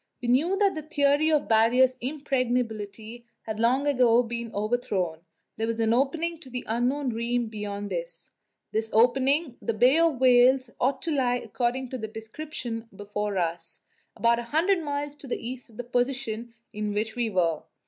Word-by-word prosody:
We 245 -2 -3
knew 320 +10 +3
that 400 -1 +3
the 310 - -4
theory 295 0 +2
of 300 -2 +3
the - - -16
Barrier's 240 +4 +4
impregnability 240 -5 -2 0.2
had 220 -1 -5
long 250 +5 +2
ago 250 -4 +4
been 235 -1 -5
overthrown; 205 -6 -1 0.4
there 225 +1 -1
was 230 0 -2
an 225 0 +2
opening 320 +6 0
to 270 - -12
the 250 0 -5
unknown 250 +5 0
realm 235 0 -1
beyond 205 -1 -5
it. - - -3 0.6
This 220 +1 -1
opening 265 +5 +3
the 230 - -2
Bay 250 +8 +5
of 330 -6 +2
Whales 255 0 +5
ought 265 +1 0
to 330 - 0
lie, 250 -3 +2
according 245 +1 -2
to 255 - -5
the 220 - -4
descriptions 225 +1 -6
before 205 0 -3
us, 165 -1 -3 0.3
about 235 0 +3
a - - -4
hundred 345 +3 +2
miles 290 -1 -3
to 280 - -11
the - - -2
east 255 +1 -7
of 220 - -18
the 245 - -4
position 245 -2 -2 0.2
in 210 -1 -3
which 215 +1 -2
we 240 -2 0
were. 170 -6 +1
245 Hz, 180 wpm, -26 LUFS, 220-275 Hz, 0.6 s, Bay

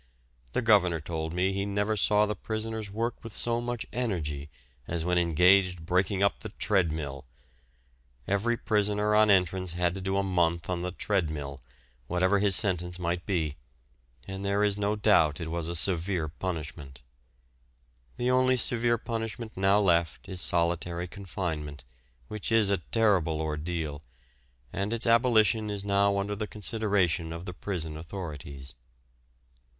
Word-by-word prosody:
The - - 0
governor 95 -7 +4
told 80 0 -4
me 90 +3 0
he 100 0 -1
never 100 +2 0
saw 105 +1 +4
the 105 - -2
prisoners 110 +1 -4
work 115 +4 -3
with 115 -3 -8
so 120 0 +1
much 120 -1 -3
energy 75 - -2 0.4
as 85 -1 -2
when 90 0 +2
engaged 90 +1 +3
breaking 95 +3 +1
up 100 - +2
the 110 - -7
"treadmill"; 80 -10 -1 1.0
every 110 +4 +1
prisoner 105 -1 +1
on 105 0 +5
entrance 95 -2 +2
had 90 0 0
to 95 - -6
do 95 +1 -1
a 100 - +2
month 85 -2 0
on 90 -1 -1
the 90 - -2
"treadmill," 75 -8 -2 0.5
whatever 95 +3 +2
his 100 -2 +5
sentence 90 -3 +1
might 85 0 -3
be, 80 -7 -1 0.7
and 95 0 -6
there 100 +1 +1
is 105 -1 +2
no 105 +1 0
doubt 85 -8 +3
it 80 -2 -5
was 85 -1 -2
a 85 - -3
severe 85 0 +1
punishment. 75 -5 -6 1.1
The 125 +1 +1
only 130 0 +4
severe 120 -1 +2
punishment 115 0 -5
now 95 +1 +3
left 85 -5 +1
is 95 -2 -4
solitary 85 +1 0
confinement, 80 -8 -5 0.4
which 105 +1 -4
is 110 -3 +4
a 100 - +3
terrible 90 -6 +1
ordeal, 80 -1 -3 0.7
and 100 +3 -2
its 115 0 +1
abolition 115 -3 +3
is 100 -1 -3
now 100 0 +3
under 100 +1 -2
the 105 +1 -4
consideration 100 -5 0
of 85 +2 -6
the 90 - -5
prison 85 -5 -4
authorities. 75 -5 -7
95 Hz, 150 wpm, -28 LUFS, 85-105 Hz, 1.1 s, on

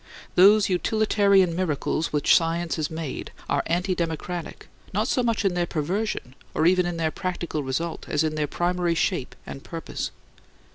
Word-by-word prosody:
Those 200 +3 +6
utilitarian 200 -2 +3
miracles 165 -2 -1
which 150 -1 +4
science 165 0 +1
has 155 -2 -1
made 160 -3 -5 0.2
are - - +1
anti 180 +3 +1
democratic, 170 0 -4 0.3
not 215 +3 +1
so 255 - +1
much 230 -3 0
in 190 - +3
their 175 -1 0
perversion, 170 - -2 0.2
or 155 - +2
even 180 0 +4
in 175 -1 -3
their 160 -1 0
practical 175 -4 -3
result, 150 +5 -3
as 150 +1 +1
in 155 -1 0
their 150 -1 -1
primary 175 +1 0
shape 165 -5 -1
and 135 - -8
purpose. 165 -1 -5
175 Hz, 160 wpm, -25 LUFS, 160-185 Hz, 0.3 s, Those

